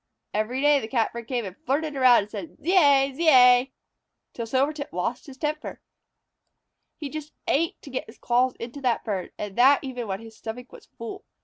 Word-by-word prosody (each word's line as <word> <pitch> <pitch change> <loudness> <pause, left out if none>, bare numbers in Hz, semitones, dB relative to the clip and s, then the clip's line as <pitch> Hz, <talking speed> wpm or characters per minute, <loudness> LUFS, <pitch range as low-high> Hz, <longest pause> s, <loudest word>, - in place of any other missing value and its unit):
Every 220 +5 -1
day 290 0 +5
the 220 - -6
Catbird 235 -1 -2
came 245 -4 -2
and 190 -1 -7
flirted 290 +6 -2
around 255 -5 +5
and 210 - -14
said, 330 - -8
"Zeay! 285 -6 +4
Zeay!" 260 -4 +5 0.6
till 230 -1 -5
Silvertip 280 +4 -1
lost 205 - -3
his 270 -2 -11
temper. 305 +1 -4 1.2
He 300 - -5
just 305 +1 -7
ached 330 +3 0
to 280 - -10
get 260 - -4
his 220 - -14
claws 250 +1 +1
into 245 +5 -8
that 245 -3 0
bird, 200 -5 -3
and 205 -2 -6
that 275 +4 +6
even 250 -4 -5
when 190 0 -3
his 225 0 -12
stomach 245 +3 -8
was - - -14
full. 230 -1 -9
255 Hz, 185 wpm, -25 LUFS, 230-285 Hz, 1.2 s, that